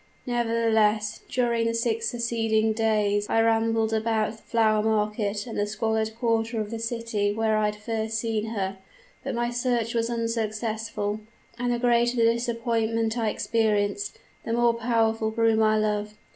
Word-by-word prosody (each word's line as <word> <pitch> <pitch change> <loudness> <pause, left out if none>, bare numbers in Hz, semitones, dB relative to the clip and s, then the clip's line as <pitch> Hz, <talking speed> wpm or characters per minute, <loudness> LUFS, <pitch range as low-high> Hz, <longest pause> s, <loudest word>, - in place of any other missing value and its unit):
Nevertheless, 225 -3 +1
during 235 -2 +1
the 230 - 0
six 230 -1 0
succeeding 225 -2 +1
days 210 -2 +1
I 225 - +2
rambled 225 0 +2
about 220 -1 +1
the 225 - -12
flower 220 -2 +2
market 210 -1 0
and 235 - -7
the 205 - +1
squalid 220 0 -1
quarter 230 -1 0
of 215 0 -3
the 230 - -4
city 230 -3 -1
where 220 +1 +1
I 215 0 +2
had 210 0 -1
first 220 +1 -3
seen 220 -1 -1
her, 195 -3 -3 0.4
but 270 - -3
my 240 0 -1
search 240 -2 0
was 230 0 0
unsuccessful; 220 -2 -2 0.4
and 245 0 0
the 240 - +1
greater 240 0 +2
the 230 0 +4
disappointment 230 -1 -1
I 225 -3 0
experienced, 205 -3 0 0.3
the 230 - -3
more 235 0 +3
powerful 225 -1 +1
grew 225 0 +2
my 215 0 +3
love. 210 0 -1
225 Hz, 160 wpm, -26 LUFS, 215-230 Hz, 0.4 s, the